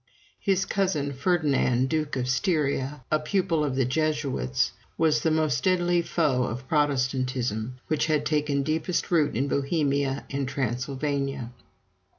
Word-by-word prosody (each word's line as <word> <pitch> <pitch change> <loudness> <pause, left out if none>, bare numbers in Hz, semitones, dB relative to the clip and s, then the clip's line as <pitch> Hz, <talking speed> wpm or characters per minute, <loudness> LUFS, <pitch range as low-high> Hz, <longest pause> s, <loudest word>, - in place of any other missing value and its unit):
His 195 -2 +1
cousin 165 -8 0
Ferdinand, 140 -5 +2
Duke 155 0 -1
of 125 -1 -1
Styria, 140 -1 0
a 155 - +3
pupil 165 0 0
of 140 -3 -1
the 135 -1 +2
Jesuits, 140 - 0 0.3
was 155 -2 +3
the 160 - +2
most 155 -5 +1
deadly 175 -2 +3
foe 145 -7 +1
of 125 +3 -5
Protestantism, 130 -5 0
which 155 0 0
had 150 -2 +1
taken 150 -2 +1
deepest 160 +5 -1
root 155 -8 +2
in 135 +3 +1
Bohemia 140 -1 0
and 140 -1 -1
Transylvania. 135 +1 -2
145 Hz, 135 wpm, -26 LUFS, 130-155 Hz, 0.3 s, a